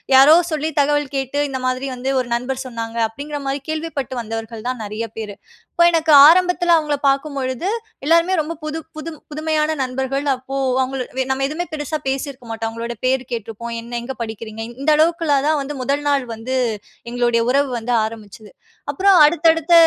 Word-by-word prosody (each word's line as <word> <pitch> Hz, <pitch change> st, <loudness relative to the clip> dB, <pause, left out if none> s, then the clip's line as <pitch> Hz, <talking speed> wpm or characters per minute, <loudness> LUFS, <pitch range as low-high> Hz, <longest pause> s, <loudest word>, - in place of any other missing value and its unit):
யாரோ 280 Hz, +4 st, +8 dB, 0.2 s
சொல்லி 310 Hz, +1 st, -1 dB
தகவல் 290 Hz, -1 st, +1 dB
கேட்டு, 270 Hz, +1 st, -2 dB
"இந்த 260 Hz, -1 st, -3 dB
மாதிரி 255 Hz, +2 st, -1 dB
வந்து 255 Hz, +2 st, -3 dB
ஒரு 250 Hz, -, -2 dB
நண்பர் 260 Hz, +2 st, -3 dB
சொன்னாங்க" 230 Hz, -2 st, -6 dB
அப்டீங்குற 290 Hz, +6 st, -6 dB
மாதிரி 270 Hz, 0 st, -2 dB
கேள்விப்பட்டு 310 Hz, -5 st, -3 dB
வந்தவர்கள் 225 Hz, 0 st, -6 dB
தான் 250 Hz, -3 st, -4 dB
நெறைய 215 Hz, +2 st, -4 dB
பேரு. 210 Hz, -2 st, -5 dB, 0.4 s
இப்போ 340 Hz, -, +3 dB
எனக்கு 320 Hz, -1 st, +2 dB, 0.2 s
ஆரம்பத்துல 360 Hz, 0 st, +4 dB
அவுங்கள 300 Hz, -2 st, 0 dB
பாக்கும் 275 Hz, +1 st, -1 dB
பொழுது 260 Hz, +6 st, -2 dB, 0.4 s
எல்லோருமே 335 Hz, +4 st, +4 dB
ரொம்ப 310 Hz, +2 st, -2 dB
புது 310 Hz, +1 st, -3 dB, 0.2 s
புது 310 Hz, +2 st, -6 dB, 0.2 s
புதுமையான 310 Hz, 0 st, 0 dB
நண்பர்கள். 265 Hz, +2 st, -2 dB
அப்போ 260 Hz, +1 st, -7 dB, 0.3 s
அவுங்க 260 Hz, +1 st, -2 dB, 0.2 s
வே -, -, +2 dB
நம்ம 265 Hz, +1 st, 0 dB
எதுவுமே 330 Hz, +4 st, -3 dB
பெருசா 310 Hz, 0 st, -3 dB
பேசிருக்க 265 Hz, -2 st, -3 dB
மாட்டோம். 225 Hz, 0 st, -3 dB
அவங்களோட 230 Hz, +1 st, -5 dB
பேரு 260 Hz, 0 st, +2 dB
கேட்டருப்போம். 230 Hz, 0 st, -5 dB
"என்ன 240 Hz, +1 st, -8 dB
எங்க 265 Hz, +3 st, -5 dB
படிக்கிறீங்க?" 220 Hz, 0 st, -6 dB, 0.2 s
இந்த 305 Hz, -, +1 dB
அளவுக்குள்ள 325 Hz, -1 st, +2 dB
தான் 310 Hz, -1 st, +3 dB
வந்து 285 Hz, +2 st, -5 dB
முதல் 280 Hz, +3 st, -1 dB
நாள் 280 Hz, -3 st, +2 dB
வந்து 240 Hz, +4 st, -4 dB, 0.6 s
எங்களுடைய 240 Hz, -1 st, +1 dB
உறவு 280 Hz, +1 st, +2 dB
வந்து 235 Hz, +2 st, -2 dB
ஆரம்பிச்சது. 215 Hz, -1 st, -8 dB, 0.4 s
அப்பறம் 390 Hz, -1 st, +4 dB
அடுத்தடுத்த 330 Hz, +1 st, +3 dB
270 Hz, 170 wpm, -20 LUFS, 240-310 Hz, 0.6 s, யாரோ